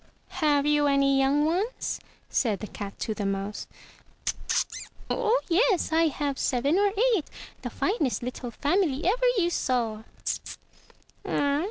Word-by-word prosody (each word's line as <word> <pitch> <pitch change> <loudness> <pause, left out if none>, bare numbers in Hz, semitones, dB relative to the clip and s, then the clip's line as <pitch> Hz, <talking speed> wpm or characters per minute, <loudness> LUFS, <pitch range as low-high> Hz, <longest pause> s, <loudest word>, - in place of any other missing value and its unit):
"Have 290 -2 +3
you 295 -1 +3
any 275 -1 +3
young 280 +2 +3
ones?*' 380 +10 -1 0.3
said 215 -5 +1
the - - -5
cat 200 -1 -7
to 220 - -1
the 210 - -4
mouse. 195 +1 -3 1.4
"Oh 485 0 +2
yes, 375 0 +3
I 325 0 +4
have 285 -2 -2
seven 280 +7 +2
or 405 0 +3 0.2
eight, 335 - -1 0.4
the - - -4
finest 305 - 0
little 250 0 -4
family 300 - 0
ever - - +2
you 345 -3 +2
saw." 235 -8 0
290 Hz, 130 wpm, -27 LUFS, 245-355 Hz, 1.4 s, I